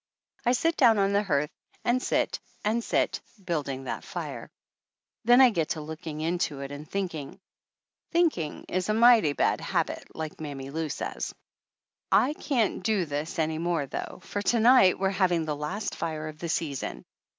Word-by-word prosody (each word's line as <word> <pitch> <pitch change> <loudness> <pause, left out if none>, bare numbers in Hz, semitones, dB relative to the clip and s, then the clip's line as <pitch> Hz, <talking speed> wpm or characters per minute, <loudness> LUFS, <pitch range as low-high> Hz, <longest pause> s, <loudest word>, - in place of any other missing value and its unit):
I 245 - +5
sit 330 +6 +1
down 230 -5 +6
on 200 0 +2
the 200 - +4
hearth 150 -7 0 0.3
and 245 +1 +2
sit - - 0 0.3
and 225 +3 +1
sit, - - 0 0.2
building 140 -6 -2
that 130 - -4
fire. - - -6 0.8
Then 245 +2 +7
I 255 -2 +8
get 165 -6 -1
to 160 - -2
looking 155 0 -6
into 160 -3 -1
it 140 0 -6
and 145 +2 -8
thinking. 175 -6 -4 0.7
Thinking 315 - +1
is 185 +2 -1
a 215 - +2
mighty 225 -9 +6
bad - - +1
habit, - - -1
like 160 0 -6
Mammy 140 -3 -6
Lou 160 +1 -2
says. - - -4 0.8
I 280 - +4
can't 255 -11 0
do 210 -4 +1
this 150 +1 -4
any 160 -1 0
more 170 -3 0
though 140 - -6
for 205 - -3
to 230 +3 +2
night 230 -5 +6
we're 190 0 +1
having 180 -4 +2
the 150 -1 -2
last 185 +8 -3
fire 155 -2 -3
of 155 0 -11
the 170 - -4
season. 150 -5 -3
170 Hz, 175 wpm, -27 LUFS, 150-215 Hz, 0.8 s, I